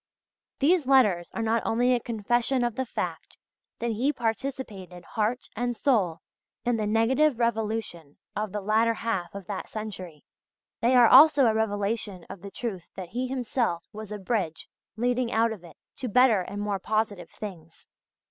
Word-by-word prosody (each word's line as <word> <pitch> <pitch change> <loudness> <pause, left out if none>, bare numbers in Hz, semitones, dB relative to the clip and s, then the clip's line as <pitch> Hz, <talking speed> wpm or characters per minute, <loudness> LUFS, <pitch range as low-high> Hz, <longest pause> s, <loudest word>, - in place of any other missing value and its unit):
These 305 0 +3
letters 210 -11 +4
are 225 - -1
not 225 +1 +1
only 245 +3 +2
a 245 - +2
confession 240 +3 0
of 240 -1 0
the 260 +2 -3
fact - - -5 0.4
that 235 0 -2
he 245 +7 +1
participated 225 - -4
heart 225 +3 -1
and 245 +1 -2
soul 195 - +1 0.4
in 240 -1 +2
the 215 -1 -1
negative 240 +6 +3
revolution 220 -9 -2 0.2
of 210 -1 -2
the 210 +1 -3
latter 220 +3 +2
half 200 -6 -3
of 200 -2 -7
that 195 0 -5
century, 185 -8 -7 0.6
they 245 +2 +3
are 245 -1 +8
also 285 +3 +8
a 225 - +4
revelation 205 -3 -2
of 185 - -9
the 200 - -8
truth 195 -5 -5
that 185 -3 -7
he 250 +4 -2
himself 245 -8 -1
was 215 0 -8
a 210 - -3
bridge 190 -5 -2 0.3
leading 245 +1 0
out 225 +1 +2
of 205 -5 -7
it, 170 - -14 0.2
to 255 - -4
better 235 -3 +5
and 200 +3 -5
more 205 -2 -1
positive 215 -1 -1
things. 170 -6 -10
220 Hz, 165 wpm, -27 LUFS, 200-245 Hz, 0.6 s, are